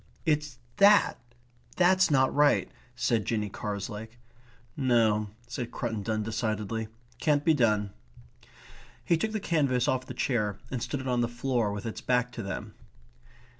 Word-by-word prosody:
"It's 150 -4 0 0.2
THAT 205 +1 +5 0.6
that's 185 +1 +4
not 130 -3 +3
right," 145 0 +3 0.2
said 115 -3 +1
Jinny 105 -1 -2
Carslake. 105 +3 -5 0.6
"No," 115 -6 +2 0.2
said 120 0 -5
Cruttendon 110 -2 -2
decidedly. 110 0 -2 0.3
"Can't 145 -2 +2
be 160 - +5
done." 105 -7 +2 1.1
He 170 - +3
took 215 +7 -1
the 215 - -2
canvas 140 - +1
off 130 0 0
the - - -7
chair 105 -6 0
and 125 -3 -3
stood 140 +2 -3
it 130 - -6
on 125 -1 +1
the 120 - +1
floor 120 -2 -1
with 100 +1 -5
its 110 - -5
back 125 -1 +1
to 120 - -6
them. 95 -2 -5
120 Hz, 145 wpm, -28 LUFS, 110-140 Hz, 1.1 s, THAT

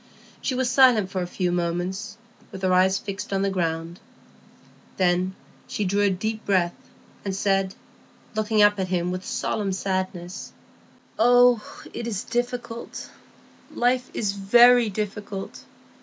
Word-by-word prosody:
She 260 - -1
was 260 0 0
silent 245 -7 +4
for 185 - -2
a 175 - -3
few 180 0 -1
moments, 180 +4 -2 0.3
with 190 - -9
her 185 -1 +3
eyes 190 +1 +4
fixed 200 +3 -6
on 195 0 0
the 195 - +1
ground; 165 -1 -2 1.0
then 185 0 +1 0.3
she 210 - -2
drew 200 +2 +1
a 205 - +4
deep 215 +4 -3
breath, 180 -3 +1 0.5
and 195 -2 -3
said, 195 -1 0 0.6
looking 215 0 +2
up 205 -1 +4
at 190 - -1
him 180 -1 -1
with 185 0 -4
solemn 200 0 -2
sadness,— 185 -2 -3 0.7
"Oh, 245 0 +6 0.3
it 235 - -4
is 205 -5 -3
difficult,—life 245 +1 -4
is 205 -3 0
very 235 +4 +5
difficult! 205 -1 -5
195 Hz, 135 wpm, -24 LUFS, 185-225 Hz, 1.0 s, Oh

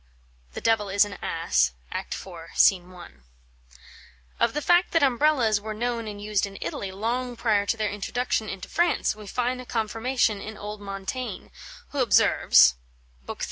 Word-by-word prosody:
The - - -6
Devil 220 -3 +1
is 200 +2 +4
an 200 -2 -9
Ass, 60 - +1 0.2
Act - - -4
iv., 175 -4 -10
SC. - - +7
I. 180 0 -13 1.3
Of 235 - +2
the 300 - 0
fact 350 +1 +3
that 330 -3 +3
Umbrellas' 250 -5 +3
were 215 0 -5
known 235 0 -2
and 205 -1 -7
used 205 -1 0
in 195 - -10
Italy 195 - -4
long 240 +5 -2
prior 210 -3 +1
to 225 - 0
their 215 -2 -1
introduction 215 +1 -2
into 195 -1 -6
France, 345 -9 +1
we 210 -1 -11
find 250 +3 -1
a - - -11
confirmation 225 -1 0
in 215 0 -8
old 210 0 -7
Montaigne, 200 +3 -5 0.4
who 285 - -4
observes, 65 - +5 0.5
lib. - - -6
215 Hz, 165 wpm, -25 LUFS, 200-245 Hz, 1.3 s, SC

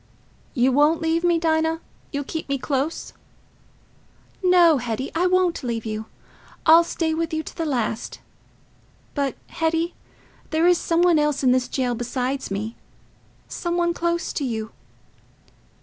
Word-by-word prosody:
"You 255 +1 +3
won't 295 +4 +4
leave 325 +1 0
me, 345 -1 +3
Dinah? 320 0 +1 0.3
You'll 285 -1 -2
keep 320 +3 -5
close 280 +4 -2
to - - -29 1.3
me?" 365 - +3
"No, 345 -4 +6
Hetty, 240 +2 -3
I 350 +3 +2
won't 365 -3 +2
leave 235 -4 -3
you. 215 0 -4 0.6
I'll 330 +1 +8
stay 330 -1 -1
with 330 +1 -2
you 315 - -2
to - - -10
the 330 - -2
last.... 235 -4 -2 0.9
But, 280 -3 -1
Hetty, 325 +1 0 0.6
there 320 +2 +2
is 355 -1 +5
some 335 +1 +1
one 345 -3 +5
else 295 -2 0
in 255 - +5
this 255 -1 +1
cell 250 -2 0
besides 250 +3 -3
me, 210 +4 -4 0.7
some 345 0 -3
one 345 0 +2
close 340 0 -1
to 290 - -2
you." 220 -4 -3
315 Hz, 150 wpm, -23 LUFS, 255-335 Hz, 1.3 s, I'll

